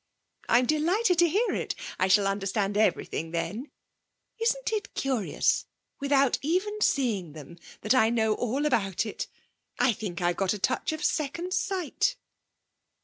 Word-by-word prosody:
'I'm 245 +1 +5
delighted 345 - +2
to 345 -1 +5
hear 420 +9 +1
it. - - -2 0.2
I 185 - +3
shall 200 +1 +4
understand 195 +1 -1
everything 205 -6 0
then. 175 - -3 0.7
Isn't 470 +1 0
it 425 -1 -3
curious 260 -7 0 0.3
without 275 -2 +2
even 375 +8 -1
seeing 210 - +1
them 155 +3 -11 0.2
that 215 - +2
I 240 -4 +4
know 220 -2 +2
all 250 +6 -1
about 205 -8 +1
it? 215 - -5 0.5
I 245 -1 +3
think 195 -5 -5
I've 175 +1 0
a 195 +2 +1
touch 190 - 0
of 315 +2 -5
second 340 +4 -1
sight.' 380 +5 0
245 Hz, 145 wpm, -27 LUFS, -, 0.7 s, I'm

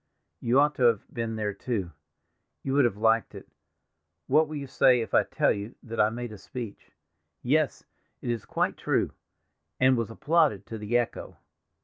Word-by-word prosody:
"You 120 +3 +3
ought 150 +1 +4
to 130 - 0
have 115 -4 +3
been 115 -1 -3
there, 105 -2 -2
too; 100 -4 -3 0.7
you 135 - -2
would 140 -2 +5
have 105 -4 0
liked 110 +1 +2
it. - - -10 0.8
What 155 +4 +4
will 155 - -6
you 140 -1 -4
say 130 -1 +4
if 115 - -4
I - - +6
tell - - +1
you 105 +3 -4
that 115 -1 -6
I 105 - +4
made 120 +1 -5
a 105 - -10
speech—yes, 105 - -4 0.4
it - - -5
is 115 -3 -3
quite - - -1
true—and 130 0 -1
was 115 -2 -1
applauded 150 - +2
to 110 - -7
the 105 +3 +1
echo. 120 -1 -3
115 Hz, 170 wpm, -27 LUFS, 105-130 Hz, 0.8 s, I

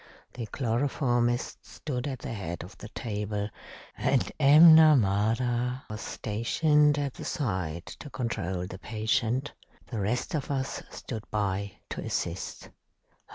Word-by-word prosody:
The 120 -3 -5
chloroformist 120 0 0
stood 130 -3 -5
at 135 -2 -3
the 115 - -6
head 85 -6 -5
of 90 - -12
the 105 - -9
table, 105 -2 -3 0.5
and - - +1
M'Namara 125 - +6
was 105 - -5
stationed 150 +7 +2
at 140 -2 -1
the - - -9
side 95 - -2
to 145 - -9
control 95 -9 -2
the 95 0 -8
patient. 115 +5 -1 0.3
The 115 - -5
rest 120 - -1
of 150 -4 -2
us 135 -2 -2
stood 110 -3 -7
by 100 -1 -1 0.2
to - - -4
assist. 85 +2 -4
115 Hz, 125 wpm, -28 LUFS, 105-135 Hz, 0.5 s, M'Namara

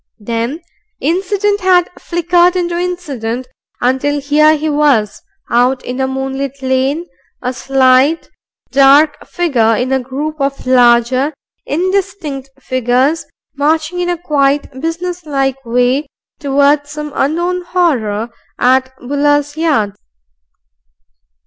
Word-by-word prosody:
Then 235 +8 -3 0.4
incident 395 +5 0
had 365 -1 +4
flickered 345 +1 +2
into 345 -1 -1
incident 280 -10 -3 0.3
until 265 +4 +1
here 305 +2 +3
he 310 +1 -3
was 290 -8 +1 0.3
out 250 +2 +2
in 250 +2 -3
a 265 - +1
moonlit 270 +1 -4
lane, 265 +5 0 0.4
a 250 +1 -1
slight, 265 +4 +2 0.4
dark 280 +2 +5
figure 245 -11 +1
in 250 +4 -1
a 265 - +2
group 280 +5 -4
of 275 0 -2
larger, 255 +3 +3 0.3
indistinct 350 -5 -2
figures, 255 +4 0 0.3
marching 315 +4 0
in 355 0 -1
a 350 - 0
quiet, 285 -4 0
business 340 +1 -4
like 270 -2 -1
way 250 +5 +1 0.3
towards 285 +1 +2
some 300 0 -6
unknown 345 +6 0
horror 245 - 0 0.3
at 260 +1 +2
Buller's 290 +2 0
yard. 295 -11 +1
285 Hz, 110 wpm, -15 LUFS, 260-330 Hz, 0.4 s, dark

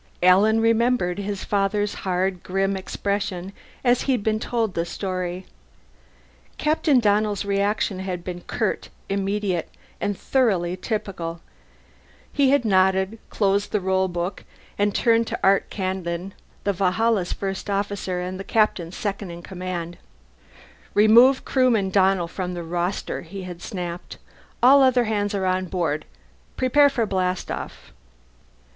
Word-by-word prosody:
Alan 200 +5 +5
remembered 230 -5 +2
his 200 -1 -4
father's 205 0 0
hard, 185 -1 -1
grim 195 +1 0
expression 195 -1 -3 0.3
as 245 -1 +3
he 270 - +1
had 245 - -1
been 215 0 +1
told 225 -3 -1
the 170 - 0
story. 185 0 -4 1.1
Captain 300 -3 +3
Donnell's 210 -2 +1
reaction 200 0 0
had 185 -2 -4
been 175 -1 -6
curt, - - -2 0.2
immediate, 195 -3 -1 0.3
and 205 -1 -2
thoroughly 190 -10 +1
typical: 185 -5 -4 0.9
he 280 -2 +3
had 280 -3 +3
nodded, 190 +1 +2
closed 200 0 +1
the 210 - +1
roll 190 0 +1
book, 175 +2 -4 0.3
and 205 0 0
turned 230 -1 +3
to - - -3
Art 195 0 +3
Kandin, 185 -1 -3 0.3
the 200 - +1
Valhalla's 195 +1 +1
First 195 0 -4
Officer 200 -2 -2
and 185 +1 -4
the - - -4
Captain's 195 -6 0
second 200 -2 -3
in 170 0 -9
command. 180 -2 -5 1.0
"Remove 235 +6 +6
Crewman 235 -7 +2
Donnell 190 -2 +3
from 180 +1 -4
the 175 - -5
roster," 175 +3 -2
he 190 +3 -8
had 180 -2 -8
snapped. 175 -4 -6 0.5
"All 275 +3 +8
other 255 -2 +4
hands 205 -2 -1
are 190 -1 -1
on 185 0 0
board. 165 -4 -1 0.5
Prepare 285 +3 +5
for 245 -5 0
blastoff." 185 -2 -3
195 Hz, 135 wpm, -23 LUFS, 180-215 Hz, 1.1 s, All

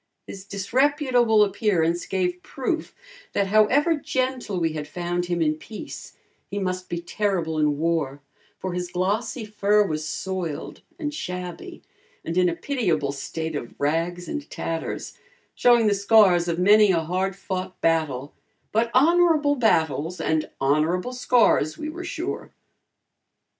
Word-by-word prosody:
His 195 0 -9
disreputable 245 +2 +2
appearance 185 -5 0
gave 180 -2 -1
proof, 285 - -3 0.4
that 200 - +2
however 260 - +4
gentle 255 - -2
we 165 -2 0
had 150 -1 -5
found 175 +2 -2
him 175 -1 0
in 155 -1 +2
peace, 210 +8 -9 0.3
he 200 - -4
must 185 -2 -3
be 170 - -2
terrible 170 -3 -1
in 150 -1 +2
war, 155 -4 -1 0.4
for 185 -1 -4
his 180 0 -4
glossy 205 +6 -1
fur 210 0 +2
was 155 -4 -2
soiled 170 0 -4 0.2
and 300 -4 -3
shabby 180 - -6 0.4
and 165 - -3
in 180 -1 +4
a 170 - -3
pitiable 170 - -1
state 160 +3 -5
of 120 -5 -6
rags 165 +4 -1
and 295 -2 -5
tatters, 165 -1 -5 0.3
showing 240 -2 +4
the 210 - +4
scars 200 -4 +4
of 170 -1 -1
many 205 +3 +6
a 170 -3 +3
hard 185 +4 -1
fought 185 -1 -5
battle, 155 -4 0 0.4
but 230 +2 +1
honorable 315 0 +4
battles 165 - +1
and 155 -1 0
honorable 155 - +1
scars 240 -11 +3
we 305 - -4
were 345 +3 -7
sure. 345 +1 -4
185 Hz, 140 wpm, -24 LUFS, 165-225 Hz, 0.4 s, many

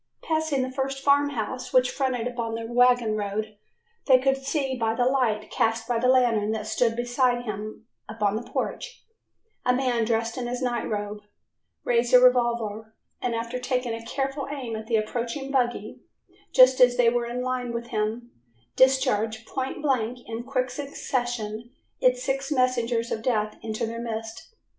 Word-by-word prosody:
Passing 315 -4 0
the 255 - -4
first 270 +1 -3
farm 285 0 +4
house 255 0 -4
which 255 -1 +4
fronted 260 -4 -1
upon 235 -2 -3
the 230 0 -4
wagon 245 -1 +3
road, 215 +1 -3 0.5
they 260 -2 +7
could 270 +1 +2
see 270 -1 -2
by 225 -2 0
the 245 - +1
light 245 -5 +1
cast 225 0 0
by 240 -1 +1
a 245 +2 +1
lantern 235 -5 +3
that 215 -1 -4
stood 225 +1 +1
beside 245 0 +1
him 215 0 -6 0.2
upon 210 -2 0
the 220 - -2
porch, - - -5 0.6
a 250 - +3
man 250 -3 +1
dressed 230 +1 -1
in 245 - -3
his 245 0 -3
night 245 -2 -2
robe 205 0 -3 0.6
raise 240 0 +1
a 250 - +10
revolver 235 -3 +2 0.3
and 240 -2 -1
after 230 +2 -3
taking 250 -2 -1
a 230 0 -6
careful 270 +3 -3
aim 260 -6 -4
at 220 0 -7
the 230 - +1
approaching 235 +5 -2
buggy, 245 -3 -1 0.5
just 255 0 +6
as 245 -1 +6
they 235 -2 +5
were 240 0 0
in 245 +1 -3
line 255 -1 -2
with 235 0 -5
him, 225 +2 -2 0.4
discharge 240 -4 +2
point 265 +4 -4
blank 250 -3 -1
in 230 0 -4
quick 255 -1 -1
succession 240 -5 -3 0.3
its 250 0 +2
six 270 +2 -2
messengers 240 -3 +1
of 220 - -2
death 215 -3 0
into 220 0 -3
their 230 +1 -5
midst. 225 - -6
240 Hz, 170 wpm, -26 LUFS, 225-255 Hz, 0.6 s, a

